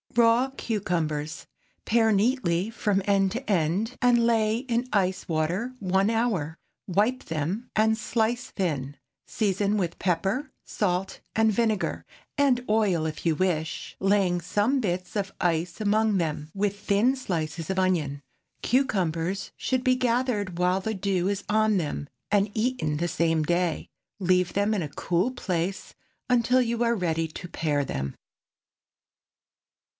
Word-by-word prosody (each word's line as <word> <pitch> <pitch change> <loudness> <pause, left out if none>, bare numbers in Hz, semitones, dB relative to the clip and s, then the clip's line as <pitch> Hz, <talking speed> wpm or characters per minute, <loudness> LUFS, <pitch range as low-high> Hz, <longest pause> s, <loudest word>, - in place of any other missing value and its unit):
RAW 235 +2 +4
CUCUMBERS. 165 -8 -2 0.4
Pare 225 -1 +3
neatly 205 -4 +1
from 205 -3 0
end 195 -1 +3
to 245 +4 -5
end, 195 +6 +1
and 240 -2 +4
lay 225 -1 +2
in 245 -1 -1
ice 190 -3 0
water 170 +10 -1
one 190 +1 +2
hour. 210 -9 0 0.3
Wipe 210 +8 +1
them 165 +9 -3
and 220 +1 +4
slice 230 +1 -1
thin. 145 -7 -2 0.3
Season 205 0 0
with 175 -4 -2
pepper, 195 - 0
salt 185 -2 -2
and 220 0 +3
vinegar—and 240 +4 -1
oil, 205 -7 +2
if 155 +1 -5
you 165 -2 +3
wish—laying 180 +2 0
some 205 - +1
bits 185 -2 -3
of 195 -2 -1
ice 170 0 0
among 215 0 +2
them, 155 -3 -2
with 200 0 -1
thin 210 +7 +2
slices 165 - -3
of 190 0 0
onion. 155 -7 0 0.4
Cucumbers 190 - 0
should 255 -1 -1
be 255 0 +4
gathered 235 -7 0
while 180 +2 +2
the 220 +3 -2
dew 190 -1 0
is 200 0 -2
on 215 0 +3
them, 145 -3 -3 0.2
and 205 0 +2
eaten 215 -10 0
the 170 +3 0
same 165 -2 +1
day. 175 0 0 0.3
Leave 180 -1 +2
them 205 +2 +1
in 205 - 0
a 150 - -3
cool 175 - 0
place 185 -5 -3 0.3
until 250 +1 +3
you 235 -1 0
are 235 0 +2
ready 165 -4 0
to 175 +3 -8
pare 150 -4 -1
them. 70 - -4
195 Hz, 140 wpm, -26 LUFS, 170-225 Hz, 0.4 s, RAW